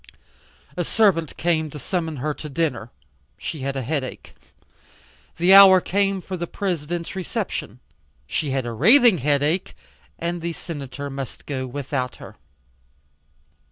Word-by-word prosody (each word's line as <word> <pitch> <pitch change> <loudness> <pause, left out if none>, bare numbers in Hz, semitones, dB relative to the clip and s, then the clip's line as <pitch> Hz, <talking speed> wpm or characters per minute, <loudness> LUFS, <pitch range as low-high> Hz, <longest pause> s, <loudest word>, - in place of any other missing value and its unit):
A - - -1
servant 185 -9 +2
came 160 -2 0
to 150 - -9
summon 160 +2 -3
her 150 +3 -2
to 150 - -8
dinner. 135 -6 -2 0.5
She 155 - -5
had 135 +1 -3
a 135 - -2
headache. 135 0 -4 1.0
The 175 +3 +5
hour 195 -1 +10
came 195 0 0
for 190 - -5
the 175 -1 -4
President's 170 -3 -3
reception. 190 - -4 0.5
She 145 - -2
had 135 -2 -1
a 120 - -3
raving 225 - +6
headache, 145 +6 0 0.4
and 170 0 -3
the 170 0 -3
Senator 140 -4 -7
must 135 -2 -7
go 130 -3 -3
without 130 -1 -3
her. - - -12
160 Hz, 135 wpm, -23 LUFS, 135-180 Hz, 1.0 s, hour